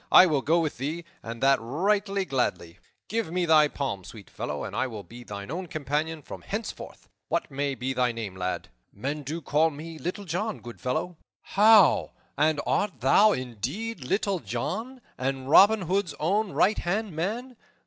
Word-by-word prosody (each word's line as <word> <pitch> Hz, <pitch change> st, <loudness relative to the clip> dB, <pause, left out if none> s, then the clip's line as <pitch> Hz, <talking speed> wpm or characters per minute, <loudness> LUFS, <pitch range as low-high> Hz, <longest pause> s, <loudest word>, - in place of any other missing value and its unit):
I 185 Hz, -, +10 dB
will 150 Hz, -6 st, +1 dB
go 165 Hz, +5 st, +3 dB
with 155 Hz, -6 st, -2 dB
thee, 160 Hz, +5 st, -3 dB, 0.2 s
and 115 Hz, +2 st, -6 dB
that 135 Hz, 0 st, +5 dB
right 185 Hz, -, +1 dB, 0.2 s
gladly. 90 Hz, -9 st, -1 dB, 0.3 s
Give 220 Hz, -6 st, -2 dB
me 180 Hz, 0 st, 0 dB
thy 155 Hz, -2 st, +6 dB
palm, 135 Hz, -10 st, -3 dB
sweet 105 Hz, +1 st, -12 dB
fellow, 75 Hz, 0 st, -4 dB
and -, -, -6 dB
I 130 Hz, -, +1 dB
will 110 Hz, -5 st, -7 dB
be 120 Hz, +7 st, -12 dB
thine 100 Hz, +1 st, -7 dB
own 180 Hz, +3 st, -4 dB
companion 155 Hz, +1 st, -2 dB
from -, -, -9 dB
henceforth. -, -, -6 dB, 0.2 s
What -, -, -1 dB
may 140 Hz, 0 st, -1 dB
be 130 Hz, +1 st, -2 dB
thy 125 Hz, -1 st, +2 dB
name, 110 Hz, -5 st, -6 dB
lad?" 90 Hz, 0 st, -3 dB, 0.2 s
"Men 140 Hz, +8 st, -4 dB
do 155 Hz, +4 st, -5 dB
call 155 Hz, +2 st, +3 dB
me 160 Hz, +2 st, -9 dB
Little 185 Hz, +5 st, -4 dB
John, 195 Hz, +6 st, -2 dB
good 120 Hz, -1 st, -11 dB
fellow." 160 Hz, +7 st, -2 dB, 0.3 s
"How? 210 Hz, -3 st, +5 dB, 0.2 s
And 155 Hz, +1 st, +2 dB
art 190 Hz, -, 0 dB
thou 200 Hz, -, +6 dB
indeed 130 Hz, -, -4 dB
Little 195 Hz, +6 st, 0 dB
John, 190 Hz, -, -4 dB, 0.2 s
and 130 Hz, 0 st, -2 dB
Robin 200 Hz, +7 st, +7 dB
Hood's 180 Hz, -3 st, -1 dB
own 195 Hz, +6 st, +1 dB
right 210 Hz, +3 st, +3 dB
hand 200 Hz, +4 st, -1 dB
man? 230 Hz, +10 st, -3 dB
155 Hz, 175 wpm, -27 LUFS, 130-190 Hz, 0.3 s, I